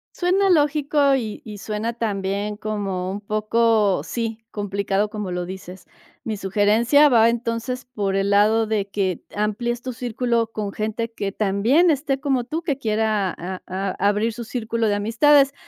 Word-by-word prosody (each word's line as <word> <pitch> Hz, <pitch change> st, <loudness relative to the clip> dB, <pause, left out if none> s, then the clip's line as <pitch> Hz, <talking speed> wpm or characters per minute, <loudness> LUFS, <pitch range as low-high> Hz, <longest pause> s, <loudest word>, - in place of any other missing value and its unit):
Suena 380 Hz, +2 st, +2 dB
lógico 290 Hz, -3 st, +3 dB
y 225 Hz, -5 st, -4 dB
y 210 Hz, -2 st, -8 dB
suena 215 Hz, +3 st, -3 dB
también 205 Hz, -2 st, -2 dB
como 200 Hz, -4 st, -3 dB
un 200 Hz, +1 st, -5 dB
poco 215 Hz, -1 st, +2 dB
sí, 225 Hz, -2 st, -3 dB
complicado, 200 Hz, 0 st, -1 dB
como 210 Hz, -3 st, -5 dB
lo 180 Hz, 0 st, -2 dB
dices. 185 Hz, 0 st, -9 dB, 0.4 s
Mi 220 Hz, -, -2 dB
sugerencia 210 Hz, +9 st, +4 dB
va 230 Hz, -4 st, +5 dB
entonces 235 Hz, +2 st, -3 dB
por 205 Hz, -6 st, -2 dB
el 195 Hz, 0 st, 0 dB
lado 215 Hz, +2 st, +4 dB
de 210 Hz, -2 st, -1 dB
que 190 Hz, -4 st, -1 dB
amplíes 235 Hz, +3 st, -1 dB
tu 255 Hz, 0 st, -5 dB
círculo 235 Hz, -1 st, -1 dB
con 210 Hz, -3 st, -4 dB
gente 220 Hz, +2 st, -3 dB
que 200 Hz, -3 st, -3 dB
también 215 Hz, -, +2 dB
esté 275 Hz, -2 st, 0 dB
como 270 Hz, -4 st, 0 dB
tú 310 Hz, +7 st, -4 dB
que 305 Hz, -5 st, -2 dB
quiera 215 Hz, -5 st, 0 dB
a 185 Hz, +2 st, -6 dB
a 190 Hz, +1 st, -2 dB
abrir 210 Hz, +3 st, +2 dB
su 235 Hz, +1 st, -6 dB
círculo 230 Hz, -1 st, -2 dB
de 205 Hz, -, +2 dB
amistades, 275 Hz, +7 st, +4 dB
220 Hz, 160 wpm, -22 LUFS, 205-245 Hz, 0.4 s, va